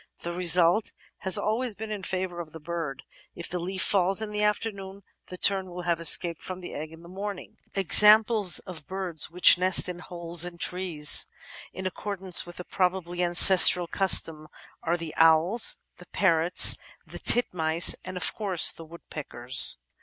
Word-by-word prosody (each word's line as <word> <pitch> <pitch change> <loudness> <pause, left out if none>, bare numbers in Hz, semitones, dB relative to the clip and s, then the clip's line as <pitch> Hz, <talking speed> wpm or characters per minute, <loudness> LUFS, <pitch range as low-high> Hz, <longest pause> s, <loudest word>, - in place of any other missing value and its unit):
The 170 - -6
result... 175 +3 +3 0.3
has 190 -2 +4
always 225 +1 -3
been 220 +1 -9
in 210 -2 -7
favour 185 -2 -6
of 160 -3 -10
the 160 - -11
bird; 160 -3 -8 0.3
if 170 - -8
the 180 - -6
leaf 185 +2 -4
falls 195 0 0
in 220 -1 -5
the 210 0 -5
afternoon, 200 -2 -5 0.2
the 180 - -11
tern 190 0 -1
will 180 0 -10
have 170 -1 -3
escaped 170 0 +4
from 185 0 -9
the 180 - -11
egg 155 +1 -9
in 165 +1 -16
the - - -15
morning 195 +1 -9 0.2
I" 195 - -2
Examples 210 +1 +3
of 165 -5 -13
birds 185 -5 -5
which 175 +1 +4
nest 185 0 +2
in 180 -1 -8
holes 170 -1 -6
in 175 -1 -9
trees, 170 -4 0 0.4
in 185 - -10
accordance 190 -1 -2
with 175 - -13
the 180 - -9
probably 180 -1 -4
ancestral 180 0 +5
custom, 165 -4 0 0.3
are 170 +1 -3
the 165 -2 -9
Owls, 165 +7 +1 0.2
the 180 - -17
Parrots, 170 -2 +3 0.3
the - - -12
Titmice, 170 -8 +2
and 185 0 -9
of - - -3
course 195 -6 +2
the 165 - -14
Woodpeckers. 135 -6 0
180 Hz, 170 wpm, -24 LUFS, 170-195 Hz, 0.4 s, ancestral